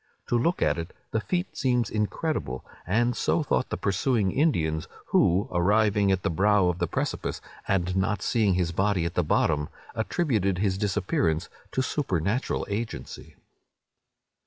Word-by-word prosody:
To - - +2
look 165 +9 +2
at - - +1
it, 85 +2 -6 0.2
the 110 - 0
feat 180 - -2
seems 125 -4 +1
incredible; 105 - -2 0.2
and 120 +6 +2
so 165 - +1
thought 130 - 0
the - - -2
pursuing 100 0 +1
Indians, 80 - +1 0.2
who, 90 +4 +3
arriving 100 +2 +3
at 95 -1 0
the - - +1
brow 100 +1 +3
of 90 0 -2
the - - +1
precipice, - - -2 0.3
and 90 -1 +1
not 95 +2 0
seeing 105 -6 +2
his 90 -2 0
body 95 0 +1
at 85 - -2
the 90 - +1
bottom, 75 -1 +1 0.2
attributed 110 - 0
his 95 0 0
disappearance 95 -5 0 0.2
to 130 - +1
supernatural 110 - -1
agency. 110 +3 -5
100 Hz, 150 wpm, -27 LUFS, 90-115 Hz, 0.3 s, who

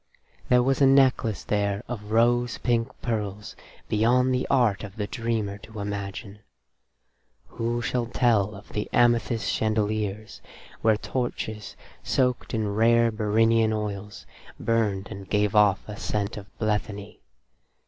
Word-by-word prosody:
There 125 -1 +5
was 135 +2 +1
a 135 - +7
necklace 130 -6 +3
there 100 -1 -1
of 105 -4 -6
rose 120 +1 +2
pink 115 -2 0 0.2
pearls 105 -3 -3 0.3
beyond 125 +4 +2
the 125 - -1
art 120 -8 +2
of 100 -1 -8
the 105 - -2
dreamer 110 -3 -3
to 110 +1 -11
imagine. 100 +1 -5 1.1
Who 120 +1 -2
shall 120 0 -1
tell 110 -4 +2
of 100 - -13
the 105 - -4
amethyst 120 -1 +2
chandeliers, 110 -1 -2 0.4
where 110 -1 +3
torches, 110 -3 -4 0.3
soaked 125 -3 0
in 105 -2 -1
rare 115 +2 +4
Bhyrinian 110 +1 +2
oils, 105 -1 -5 0.3
burned 105 -4 0
and 100 -2 -8
gave 105 -1 +1
off 105 -3 +4
a 105 - -6
scent 105 0 -2
of 100 -2 -9
blethany? 105 -2 -3
110 Hz, 130 wpm, -25 LUFS, 105-115 Hz, 1.1 s, a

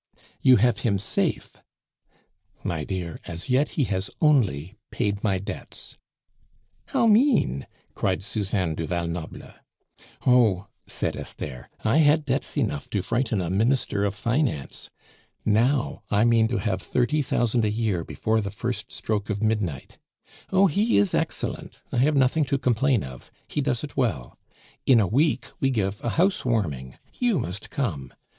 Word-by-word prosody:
"You 130 -1 +7
have 120 +3 +3
him 100 -4 +1
safe 95 - -1 0.5
" - - -38
"My 80 -3 -2
dear, 90 -1 -4
as 85 +7 -5
yet 135 +4 +3
he 145 - +3
has 95 -4 -2
only 110 - +2
paid 100 0 -2
my 100 -3 +2
debts." 95 - -7 0.9
"How - - +2
mean!" 220 - +3 0.3
cried 95 -1 -1
Suzanne 95 -5 -1
du 80 0 -4
Val 85 0 -1
Noble. 85 -1 -6 0.7
"Oh!" 115 -7 +4 0.2
said - - -2
Esther, 65 -4 -7 0.2
"I 110 +7 +3
had 150 0 +4
debts 135 +3 -1
enough 145 -2 -1
to 100 -6 -1
frighten 115 -2 0
a 85 -1 -2
minister 110 0 +1
of 100 -1 0
finance. 115 - -2 0.6
Now, 115 +1 +2
I 105 +1 +3
mean 115 -1 +4
to 120 - -1
have 95 -4 -1
thirty 135 +9 +1
thousand 120 -3 +1
a 105 - +2
year 105 -5 -1
before 110 +5 0
the 100 - -3
first - - -4
stroke 105 -1 -3
of 105 0 -2
midnight. 105 -11 -2 0.5
Oh! 190 +1 +5
he 205 +6 +2
is 100 -1 +3
excellent, - - -3
I - - -2
have 145 +5 +3
nothing 140 +3 +3
to 140 +1 0
complain 130 -1 +2
of. 65 -1 -10 0.2
He 150 - -2
does 135 -3 -1
it 150 - -7
well. 95 - -2 0.5
In 125 -4 +7
a 105 - +3
week 130 - +1
we 135 - +2
give 105 -5 -1
a 120 - 0
house 190 - +2
warming; 75 - -2 0.2
you 245 -6 +1
must 90 - -4
come. 80 - -3
110 Hz, 160 wpm, -25 LUFS, 95-135 Hz, 0.9 s, You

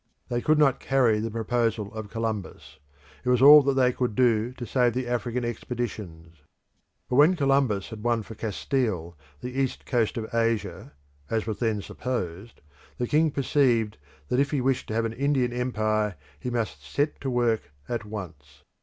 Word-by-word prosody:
They 120 0 -1
could 155 +4 +3
not 140 -3 +3
carry 125 -5 +2
the 115 +1 -2
proposal 115 -2 -1
of 110 -2 -6
Columbus; 100 -9 -5 0.4
it 125 - -1
was 125 -1 +4
all 145 +3 +10
that 140 -1 +1
they 130 -1 +4
could 120 -4 -2
do 120 -2 +2
to 125 - -7
save 120 +1 +2
the 130 0 -1
African 120 0 -2
expeditions. 105 -9 -5 0.7
But 125 - 0
when 155 +6 +6
Columbus 135 - +1
had 110 -1 -7
won 120 -1 +1
for 110 - -10
Castile 105 -5 -2 0.3
the 125 - -5
east 135 -2 -2
coast 120 -3 0
of 110 0 -5
Asia 115 -1 -1 0.4
(as 110 -1 -1
was 105 -2 -4
then 110 -4 0
supposed) 110 -4 -5 0.4
the 125 - -1
king 155 +5 +3
perceived 125 - +1 0.3
that 125 - +1
if 140 0 +2
he 145 - 0
wished 130 0 0
to 110 - -3
have 115 0 +1
an 115 - -3
Indian 135 -1 +1
empire 110 -4 0 0.2
he 125 - -4
must 120 -3 -3
set 145 +1 -2
to 135 - -2
work 120 - 0 0.2
at 120 -2 -3
once. 80 -9 -9
120 Hz, 175 wpm, -26 LUFS, 110-130 Hz, 0.7 s, all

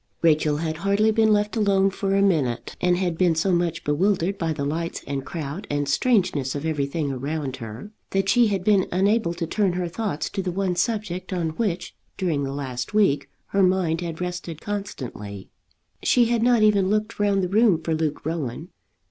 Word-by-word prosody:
Rachel 155 -2 +3
had 160 0 -2
hardly 200 +4 +2
been 220 0 +3
left 210 +1 +1
alone 195 -3 +3
for 195 0 -1
a 195 - +3
minute, 135 -11 0
and 180 0 +3
had 175 -3 -1
been 175 -3 +3
so 175 +4 +1
much 170 -2 0
bewildered 180 +5 +1
by 165 -2 0
the 145 -2 -2
lights 165 +4 -3
and 140 -1 -3
crowd 155 +4 -6
and 145 -1 -1
strangeness 165 - +1
of 145 +2 -4
everything 145 -1 -1
around 135 0 -3
her, 115 - -8 0.2
that 195 0 0
she 235 +4 +5
had 195 -3 -1
been 200 -2 +3
unable 195 -1 +2
to 170 -1 -2
turn 190 +2 +1
her 180 0 -2
thoughts 185 -3 -3
to 195 - -2
the 185 -1 -2
one 185 0 -1
subject 200 -2 -2
on 175 -3 -1
which 180 -1 -3 0.2
during 160 -7 0
the 135 - -3
last 130 +3 -4
week 145 -10 +2 0.2
her 200 - +2
mind 180 -3 +2
had 165 -2 -5
rested 180 -3 -4
constantly. 125 - -6 0.5
She 245 -1 +4
had 235 0 +1
not 240 -2 +4
even 200 -3 +4
looked 215 +2 -1
round 200 -2 +2
the - - +1
room 205 -2 +4
for 165 0 -2
Luke 155 -2 -2
Rowan. 160 0 -3
175 Hz, 190 wpm, -24 LUFS, 155-200 Hz, 0.5 s, she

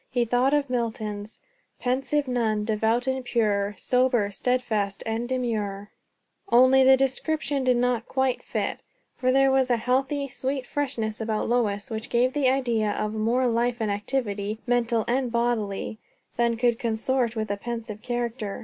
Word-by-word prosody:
He 245 -2 +1
thought 245 +3 +2
of 290 -1 +2
Milton's 220 -4 -3 0.4
"Pensive 270 +3 0
nun, 220 -4 0
devout 225 +3 +1
and 260 0 -1
pure, 210 -4 0
Sober, 250 -5 +2
stedfast, 215 -3 -1
and 225 +2 -2
demure" 215 -6 -2 0.6
only 260 +2 +6
the 265 0 +7
description 275 +1 -1
did 250 -1 +3
not 245 -2 0
quite 265 -1 0
fit; - - -3 0.4
for 255 0 +1
there 270 +1 +4
was 265 -1 +2
a 240 - +3
healthy, 270 +4 0
sweet 265 0 -3
freshness 240 -7 -2
about 220 -1 -1
Lois 230 -1 0
which 220 +1 -4
gave 245 +2 +2
the 280 -3 +2
idea 235 -6 +1
of 215 +1 -2
more 230 +4 +1
life 240 0 +1
and 215 -2 0
activity, 205 -1 -2
mental 235 -2 +1
and 250 0 0
bodily, 220 -3 -1 0.4
than 235 -1 +1
could 240 0 +2
consort 235 0 0
with 215 -2 -2
a 205 - -1
pensive 225 -1 -6
character. 240 -3 -3
240 Hz, 155 wpm, -25 LUFS, 220-255 Hz, 0.6 s, the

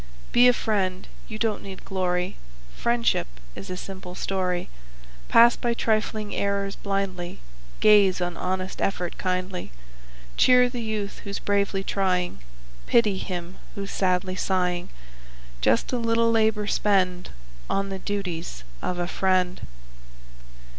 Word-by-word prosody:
Be 245 +1 +7
a - - +8
friend. 190 -6 -1 0.2
You 215 - -6
don't 220 -2 0
need 190 -1 -9
glory. 180 -2 -1 0.4
Friendship 235 - +1 0.3
is - - -9
a 185 - -4
simple 185 -1 -8
story. 185 -2 -1 0.6
Pass 235 +1 +7
by 235 -1 -1
trifling 215 -2 0
errors 200 0 -1
blindly, 195 -3 -3 0.4
Gaze 205 -4 +6
on 175 -1 -2
honest 185 +1 -3
effort 180 -3 -2
kindly, 185 - -2 0.7
Cheer 250 0 +6
the 245 -1 -5
youth 215 -3 -3
who's 200 0 -4
bravely 200 -1 0
trying, 185 - 0 0.5
Pity 210 -5 +3
him 180 -1 -5 0.2
who's 200 0 -5
sadly 185 -1 0
sighing; 180 -2 0 0.7
Just 115 - +2
a 250 - +1
little 230 0 +2
labor 220 -2 +2
spend 185 -4 +1 0.4
On 195 0 0
the 195 0 -4
duties 175 - -4 0.2
of 180 - -2
a 175 - 0
friend. 185 -1 +1
195 Hz, 125 wpm, -25 LUFS, 180-210 Hz, 0.7 s, a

